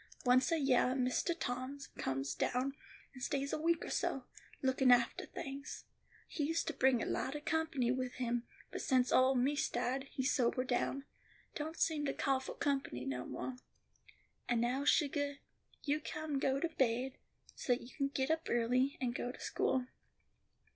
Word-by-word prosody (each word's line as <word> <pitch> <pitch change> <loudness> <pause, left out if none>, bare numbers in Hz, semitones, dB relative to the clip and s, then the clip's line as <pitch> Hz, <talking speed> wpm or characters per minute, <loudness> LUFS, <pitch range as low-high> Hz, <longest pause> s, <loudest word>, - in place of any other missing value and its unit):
Once 255 +2 +5
a 330 - +3
yeah 260 -3 +3
Mistah 255 +6 +1
Tom 255 -2 -3 0.2
comes 135 +1 -1
down 255 +2 0 0.4
and 255 - -11
stays 280 +2 -1
a - - 0
week 335 0 +2
or - - -5
so, 270 - 0 0.4
lookin' 260 -1 +4
aftah 240 -1 +3
things. 275 +1 -6 0.4
He 310 - -2
used 330 +2 0
to - - -2
bring 260 -2 +3
a - - -2
lot 265 +3 -1
of 295 - -6
company 315 -6 +1
with 255 -1 -2
him, 240 -1 -1 0.2
but - - -4
since 255 -2 +3
ole 260 +1 +5
Miss 270 +4 +2
died, 255 +3 -1
he's 260 0 0
sobered 255 0 +1
down; 270 +2 0 0.5
don't 315 +2 -4
seem 310 -2 +1
to 275 - -1
cah 270 -1 +2
fo' 265 - -7
company 270 - -1
no 125 -2 -3
more. 260 - -4 0.9
"And 240 -1 +3
now, 250 +4 +1
sugah, 285 -2 +2 0.5
you 295 0 +1
come 305 -2 -3
go 270 0 +2
to 335 - 0
baid, 255 +1 +1 0.3
so 250 - +1
you 245 0 -5
can 275 -1 +1
get 275 +1 0
up 320 +1 0
early, 250 +4 +2
and 245 -3 -1
go 245 0 -2
to - - -13
school." 255 -1 0
265 Hz, 175 wpm, -35 LUFS, 250-285 Hz, 0.9 s, Once